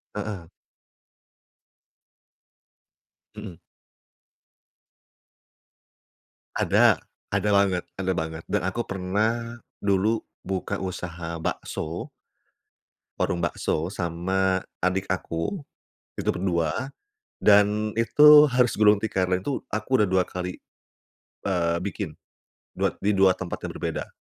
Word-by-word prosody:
Heeh. 105 -5 -5 2.9
Mhm. 105 -5 -8 3.0
Ada - - +4 0.3
ada 105 - +1
banget 100 -3 +3
ada 95 -1 -1
banget 80 -1 -4
dan - - -1
aku 95 +6 -2
pernah 110 +5 -1 0.2
dulu 100 +3 +2 0.2
buka 95 +1 -2
usaha 85 -3 -5
bakso. 80 +1 -4 1.1
Warung 85 - 0
bakso 85 +2 -2
sama 95 +2 0 0.2
adik 95 +1 +1
aku. 95 - -3 0.5
Itu - - -2
berdua, 90 - -1 0.5
dan 105 +1 +4
itu 150 +6 +8
harus 125 -1 +3
gulung 105 -1 +5
tikar, 95 -4 -1
itu 130 +9 -3
aku 110 +3 -3
udah 105 - +2
2 95 0 +3
kali, 90 0 -5 0.9
eee, 85 -3 +1
bikin, 100 - -4 0.6
dua - - +1
di 105 - +2
2 95 -1 +6
tempat 90 -2 -6
yang - - -6
berbeda. - - -4
95 Hz, 95 wpm, -25 LUFS, 90-105 Hz, 3.0 s, itu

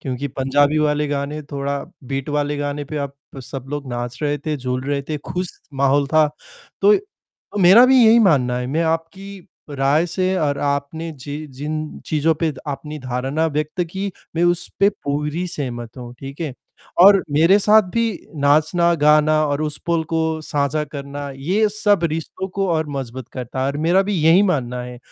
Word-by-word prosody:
क्योंकि 135 +2 -4
पंजाबी 145 +3 +2
वाले 150 0 +1
गाने 145 +1 -3
थोड़ा 140 0 -2 0.3
बीट 135 +1 -3
वाले 145 0 -1
गाने 145 0 -3
पे 150 +2 -6
आप 140 0 -9 0.3
सब 130 +1 -7
लोग 145 0 -4
नाच 120 0 -4
रहे 145 0 0
थे, 150 +1 -3
झूल 125 -1 -3
रहे 140 0 -1
थे, 155 - -1
खुश 180 +5 -3 0.3
माहौल 140 +1 +2
था। 155 0 +4 0.6
तो 415 - +7 0.7
मेरा 190 +7 +8
भी 260 -2 +6
यही 225 +1 +7
मानना 140 - +3
है, 125 - -3
मैं 155 +6 0
आपकी 175 +4 -4 0.2
राय 140 +4 +2
से 185 +2 0
और 145 -3 0
आपने 145 +3 -2
जि 145 +2 -7
जिन 155 +3 -5
चीज़ों 160 +1 +2
पे 165 -2 +1
अपनी 150 +1 -5
धारणा 135 +4 -1
व्यक्त 155 +3 -2
की, 195 +2 -4 0.2
मैं 170 - +3
उस 175 0 +1
पे 200 - +6
पूरी 150 0 -3
सहमत 120 -7 -5
हूँ, 120 -1 -8
ठीक 135 +3 -9
है? 150 -6 -3 0.5
और 195 +1 +8
मेरे 165 +7 +5
साथ 215 +1 +5
भी 230 0 +2 0.4
नाचना, 155 +4 +3
गाना 155 0 +4
और 145 +1 -1
उस 150 -1 -2
पल 170 -1 +2
को 160 -1 0
साझा 150 0 -1
करना 140 0 -6
ये 185 +11 +1
सब 205 -3 +1
रिश्तों 165 +4 -4
को 195 +1 -2
और 160 -1 0
मजबूत 130 -2 -6
करता 125 0 -5
है 130 - +1
और 140 - -2
मेरा 185 +3 +4
भी 205 +1 -2
यही 165 +5 +6
मानना 125 -10 -1
है। 125 0 -8
150 Hz, 180 wpm, -20 LUFS, 140-170 Hz, 0.7 s, मेरा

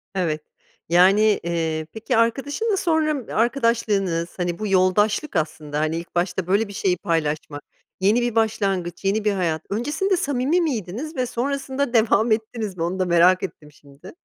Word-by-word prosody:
Evet. 160 -5 -1 0.5
Yani, 185 +4 +5 0.2
eee, 160 -2 -2
peki 225 +2 -1
arkadaşınla 285 - 0
sonra, 320 -4 +1
ımm, 275 -6 -3
arkadaşlığınız, 220 -8 +1
hani, 175 -1 -2
bu 215 - -2
yoldaşlık 205 +7 +2
aslında. 150 -2 -2
Hani, 155 +1 0
ilk 170 +1 -9
başta 175 0 -1
böyle 205 +4 +2
bir 200 - -10
şeyi 190 -2 0
paylaşmak, 155 -3 -2 0.4
yeni 210 +6 +3
bir 240 -1 -1
başlangıç, 195 -5 -1
yeni 205 +2 +1
bir 210 - +3
hayat. 170 -5 -1
Öncesinde 300 - 0
samimi 285 +1 +1
miydiniz 260 - -3
ve 255 - 0
sonrasında 265 +1 -2
devam 225 0 +3
ettiniz 220 -3 -2
mi? 165 - -2
Onu 180 +3 -2
da 185 - +2
merak 180 +1 +4
ettim 150 -3 -7
şimdi. 140 -1 -15
200 Hz, 160 wpm, -22 LUFS, 170-240 Hz, 0.5 s, Yani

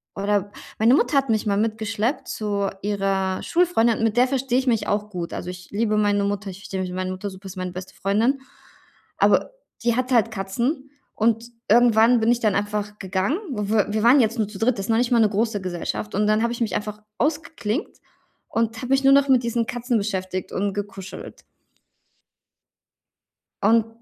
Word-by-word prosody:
oder 200 0 0 0.3
meine 230 +4 +5
Mutter 290 - +2
hat 275 -2 +1
mich 220 -1 +1
mal 200 -1 +1
mitgeschleppt 220 +3 -1
zu 200 -2 -2
ihrer 195 -2 0
Schulfreundin, 330 -11 +2
und - - -1
mit 225 0 +1
der 250 +1 +5
verstehe 260 -1 0
ich 265 - -4
mich 230 -3 +2
auch 210 +1 -1
gut. 175 -4 -5
Also, 180 - -5
ich 180 -1 -9
liebe 215 +1 0
meine 205 -1 +2
Mutter, 205 0 -2
ich 185 - -11
verstehe 190 -1 -5
mich 185 - -3
mit 180 - -5
meiner 185 0 -2
Mutter 185 +2 -5
super, 190 +1 -11
ist 190 0 -9
meine 185 -1 -3
beste 185 +1 -9
Freundin. 225 +8 +1 0.8
Aber - - +3 0.3
die 235 -1 +2
hat 255 +1 -1
halt 230 -2 +4
Katzen. 240 - -2 0.3
Und 225 +1 +2 0.2
irgendwann 235 +1 +5
bin 225 +1 +3
ich 240 - +2
dann 215 -3 +2
einfach 210 0 -2
gegangen. 190 - -1
W 210 -2 +1
wir 215 0 -1
waren 250 +5 +7
jetzt 230 +2 0
nur 215 - +1
zu 205 -2 -10
dritt, 230 0 +2
das 195 - -3
ist - - -14
noch 225 - +3
nicht 240 0 +1
mal 240 - +4
'ne 220 - +5
große 215 0 -1
Gesellschaft. 185 +3 -4
Und 210 +1 +2
dann 215 +2 +2
habe 235 - 0
ich 240 - -7
mich 215 -5 0
einfach 210 0 -4 0.2
ausgeklinkt 300 - -2 0.5
und 225 0 -1
habe 250 +2 -6
mich 270 +1 +3
nur 270 0 +6
noch 280 0 +5
mit 255 -2 +5
diesen 235 0 0
Katzen 245 0 -1
beschäftigt 190 -3 -3
und 200 +1 -1
gekuschelt. 195 -2 -7 2.2
Und 225 +2 +4
215 Hz, 200 wpm, -23 LUFS, 200-235 Hz, 2.2 s, waren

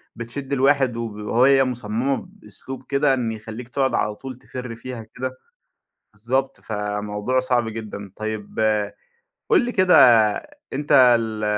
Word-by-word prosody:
بتشد 130 +4 -6
الواحد، 135 -2 +2
وهي 115 +4 +2
مُصممة 125 +1 -2
بأسلوب 135 -9 -10
كده 140 0 +3
إنه 115 -4 -1
يخليك 110 +3 -9
تقعد 135 +1 0
على 105 0 0
طول 130 0 -8
تفرّ 125 -2 -7
فيها 120 -1 -7
كده. 130 +3 -6 0.8
بالضبط، 130 +6 -2
فَموضوع 105 +3 -2
صعب 125 -3 0
جدًا. 105 -3 -7
طيب 110 -1 -5 0.9
قل 410 -9 +5
لي 245 - -2
كده 185 -3 +4 0.8
أنت 145 +2 -4 0.3
ال 110 -1 -4
120 Hz, 125 wpm, -22 LUFS, 110-135 Hz, 0.9 s, قل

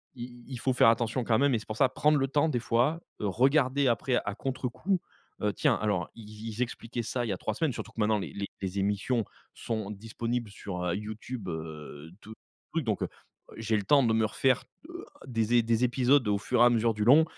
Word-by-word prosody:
il 120 0 -9
il 130 -2 -6
faut 130 - +1
faire 125 - +5
attention 115 +1 +2
quand 110 -1 +3
même 140 +1 +3
et 115 - +2
c'est 105 - -13
pour 110 - -4
ça 130 - +4
prendre 150 +4 +3
le 135 -1 +1
temps 145 +3 +2
des 135 -6 0
fois, 125 +8 +1 0.2
heu, 105 - -1
regarder 135 - +3
après, 125 +2 +1
à 105 - -3
contrecoup. 135 - -2 0.4
Heu, 105 -1 +1
tiens - - +2
alors 100 -6 -1
ils 115 -2 -11
ils 110 0 -8
ils - - -2
expliquaient 120 0 -3
ça, 120 +2 -2
il - - -4
y - - 0
a 95 - -2
3 110 - -2
semaines, 160 +5 0
surtout 115 -1 -7
que - - -10
maintenant 105 0 +2
les - - -6 0.3
les 95 0 -2
émissions 105 +4 0 0.3
sont 110 -3 -4
disponibles 115 +2 -4
sur, 100 -3 -6
heu, 90 -1 0
YouTube, 110 +1 -6
heu, 80 -2 -7
tous 110 - -11 0.4
trucs 165 -1 0
donc 105 -4 -1
heu, - - -1 0.5
j'ai 110 -1 0
le 105 - -2
temps 140 +6 +5
de 115 - +2
me 110 0 +3
refaire, 125 +4 +1 0.2
heu, 350 +1 -8 0.2
des 115 -2 0
é - - +5
des 115 +1 +2
épisodes 125 +1 +3
au 105 -1 +2
fur 100 - -1
et - - +9
à - - +7
mesure 115 -1 +2
du 105 -1 -1
long 145 +7 +8
115 Hz, 235 wpm, -29 LUFS, 105-130 Hz, 0.5 s, et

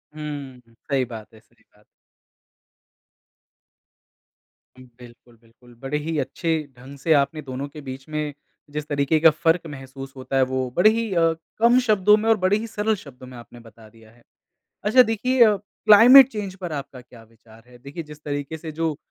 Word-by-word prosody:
हुँ, 145 -4 -7
हुँ। 115 - -26
सही 135 -2 +1
बात 115 -3 -11
है 110 - -17
सही 115 0 -32
बात - - -33
है। 105 - -26 2.9
बिल्कुल, 120 -1 -17
बिल्कुल। 120 +1 -22
बड़े 135 +2 -3
ही 155 +1 -4
अच्छे 165 +3 -3 0.3
ढंग 135 +3 -12
से 160 +3 +1
आपने 150 +2 +1
दोनों 135 +1 -6
के 150 +1 -11
बीच 135 0 -9
में 150 -1 -3 0.4
जिस 150 0 -6
तरीके 145 +1 0
का 165 +1 +7
फ़र्क 165 +2 +1
महसूस 135 -1 -10
होता 130 +1 -6
है, 130 - +4
वो 130 0 -2
बड़े 180 +5 +5
ही 225 -1 -2
अ, 165 -2 +2 0.2
कम 235 +3 +4
शब्दों 210 -3 +3
में 220 +1 -1
और 225 - +4
बड़े 185 +2 +1
ही 225 +1 -6
सरल 215 0 -1
शब्दों 130 -7 -13
में 125 -1 -12
आपने 120 0 -14
बता 115 -1 -17
दिया 110 -1 -20
है। 120 +1 -25 0.6
अच्छा 245 +5 +6
देखिए 245 +2 +1
अ, 210 -2 +3
क्लाइमेट 230 +6 +6
चेंज़ 205 -6 -6
पर 175 -3 -5
आपका 140 -3 -7
क्या 120 -2 -17
विचार 115 0 -21
है? 125 - -17
देखिए, 140 +6 -8
जिस 150 -1 -14
तरीके 145 +1 -4
से 160 0 -8
जो 160 -1 -2
145 Hz, 185 wpm, -22 LUFS, 130-185 Hz, 2.9 s, का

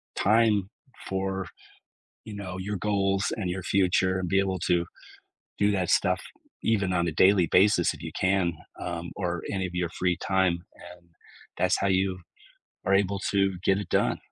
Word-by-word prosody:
time 105 -2 +3 0.4
for, 95 -1 -2 0.8
you 105 -2 -8
know, 95 -2 -6
your 100 +1 -3
goals 100 0 0
and 95 -4 -2
your 90 0 -4
future, 95 -1 +2
and 90 -2 -3
be 95 - +3
able 95 -2 -1
to 85 -1 +2 0.7
do 105 0 +3
that 95 -3 0
stuff - - +2 0.4
even 100 -4 +1
on 85 -1 +1
a - - -2
daily 95 0 +4
basis 95 -1 +3
if - - -12
you - - -5
can, 95 -2 +2 0.3
um, 85 0 -5
or 85 -3 -2
any 95 -2 -1
of 90 - -8
your 90 -1 -1
free 90 0 0
time, 95 -3 +1 0.2
and 85 0 -14 0.5
that's - - +2
how 100 - 0
you 95 0 +1 0.7
are 95 - +2
able 100 0 +2
to 95 -1 +2
get 95 0 +4
it 100 -4 -6
done. - - +1
95 Hz, 170 wpm, -27 LUFS, 90-100 Hz, 0.8 s, daily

